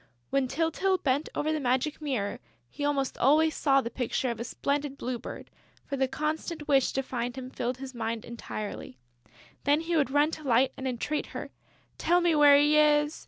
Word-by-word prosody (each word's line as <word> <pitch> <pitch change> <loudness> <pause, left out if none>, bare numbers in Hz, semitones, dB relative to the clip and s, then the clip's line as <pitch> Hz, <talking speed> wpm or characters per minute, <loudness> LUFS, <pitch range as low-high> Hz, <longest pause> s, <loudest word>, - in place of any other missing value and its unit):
When 275 -1 +2
Tyltyl 330 +7 +1
bent 280 +2 +1
over 310 +1 0
the 310 - -1
magic 265 +4 0
mirror, 255 -9 -2 0.3
he 290 - -6
almost 280 -2 -1
always 310 +5 +4
saw 275 -2 +3
the 235 - -5
picture 250 0 -1
of 235 - -6
a - - -2
splendid 280 +3 -2
Blue 250 -2 -3
Bird, - - -9 0.3
for 280 - -3
the 265 -1 +1
constant 305 +2 -3
wish 270 -2 +3
to 270 - -1
find 245 -1 -3
him 260 -1 -7
filled 245 0 -3
his 265 0 -8
mind 230 -1 -3
entirely. 215 - -7 0.7
Then 290 +2 +3
he 335 +1 -2
would 290 -5 +2
run 290 +3 +3
to 310 - -7
Light 260 0 +3
and 265 - -4
entreat 260 +5 -2
her: - - -7 0.5
"Tell 350 +1 +3
me 345 -1 +2
where 290 -2 +7
he 295 +1 +4
is!... 295 0 +3
275 Hz, 195 wpm, -28 LUFS, 255-300 Hz, 0.7 s, where